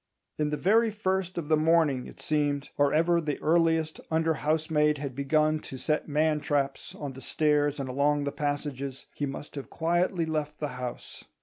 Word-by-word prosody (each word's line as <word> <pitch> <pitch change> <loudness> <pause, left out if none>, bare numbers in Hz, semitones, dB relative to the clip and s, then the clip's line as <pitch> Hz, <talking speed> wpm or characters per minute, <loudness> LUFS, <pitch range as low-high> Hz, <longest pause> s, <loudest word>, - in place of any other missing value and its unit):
In 150 -1 +1
the 150 - -1
very 225 +7 +4
first 190 -3 -2
of 165 -4 -3
the 155 - +4
morning, 155 -4 +2
it - - -13
seemed, 145 -2 -1
or 145 -1 +3
ever 170 +3 +3
the 150 -3 -3
earliest 160 -1 +2
under 160 0 +2
housemaid 150 0 +1
had 140 -2 -5
begun 155 +3 +2
to 135 - -8
set 150 +4 -1
man 155 +1 +2
traps 140 -2 -2
on 145 -2 -6
the 130 - -10
stairs 150 +1 +1
and 135 - -3
along 145 +3 +1
the 140 - -2
passages, 140 -2 -3
he 145 - -2
must 140 +2 -7
have 140 -2 -7
quietly 175 +1 +1
left 150 -1 -2
the 150 - -3
house. 125 -1 -7
150 Hz, 185 wpm, -28 LUFS, 145-160 Hz, -, very